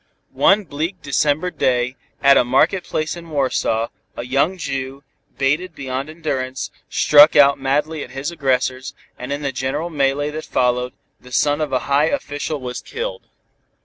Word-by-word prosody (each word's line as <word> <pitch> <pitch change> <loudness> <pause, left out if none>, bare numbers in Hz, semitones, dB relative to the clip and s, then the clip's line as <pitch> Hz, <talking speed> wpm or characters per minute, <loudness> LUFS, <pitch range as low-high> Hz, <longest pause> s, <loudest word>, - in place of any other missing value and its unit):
One 205 +2 +4
bleak 165 +2 -4
December 150 +5 +1
day, 125 -3 0 0.3
at 140 0 +7
a - - +5
market 150 +9 +2
place 155 -1 -2
in 170 -1 -10
Warsaw, 130 -5 0 0.3
a 120 - -4
young 140 +9 +1
Jew, 135 -3 -4 0.3
baited 150 +6 0
beyond 135 +2 -4
endurance, 135 -5 -4 0.2
struck 150 +1 +6
out 140 -1 +6
madly 145 +3 -1
at - - -10
his 135 +4 -4
aggressors, 130 -4 -1 0.2
and 125 +2 -6
in 145 +1 -3
the 140 - -1
general 135 +6 -3
mêlée 145 0 0
that 155 +1 -6
followed, 125 0 0 0.3
the 125 - -16
son 145 +4 +2
of 150 -3 -2
a 130 -1 +1
high 140 +2 +3
official 145 -1 -3
was 125 -1 -5
killed. 480 +1 -6
140 Hz, 160 wpm, -20 LUFS, 130-155 Hz, 0.3 s, at